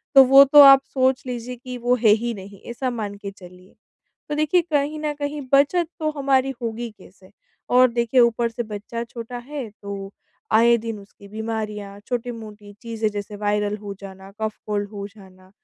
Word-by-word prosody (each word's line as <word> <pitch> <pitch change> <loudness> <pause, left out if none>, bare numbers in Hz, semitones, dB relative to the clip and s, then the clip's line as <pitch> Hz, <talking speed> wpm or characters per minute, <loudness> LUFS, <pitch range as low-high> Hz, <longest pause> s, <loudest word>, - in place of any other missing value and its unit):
तो 270 - +11
वो 270 +2 +9
तो 290 +2 +8
आप 275 -1 +9
सोच 260 0 +1
लीजिए 250 0 -5
कि 250 -1 -6
वो 245 +1 +1
है 215 - +6
ही 230 +3 +2
नहीं, 195 -1 -11
ऐसा 255 +2 -2
मान 210 -4 -4
के 200 -1 -8
चलिए। 180 -1 -16 0.5
तो 295 - -1
देखिए 310 +4 +2
कहीं 295 +1 0
न 300 -1 -2
कहीं 290 0 -3
बचत 310 +5 +4
तो 310 -1 0
हमारी 270 -1 +1
होगी 230 +1 -4
कैसे? - - -19 0.4
और 250 0 +5
देखिए 235 +2 +1
ऊपर 235 0 +2
से 235 +1 -4
बच्चा 220 +2 -6
छोटा 235 +1 -8
है, 265 -1 -7
तो 200 -1 -8 0.4
आए 235 +2 +6
दिन 225 -2 -5
उसकी 200 0 -16
बीमारियाँ, 210 -2 -5
छोटी-मोटी 220 -4 -6
चीजें 225 -1 -2
जैसे 205 0 -6
वायरल 210 0 -1
हो 205 -1 -7
जाना, 190 0 -11
कफ-कोल्ड 210 -1 -3
हो 200 -1 -6
जाना। 190 -3 -18
230 Hz, 175 wpm, -22 LUFS, 205-255 Hz, 0.5 s, तो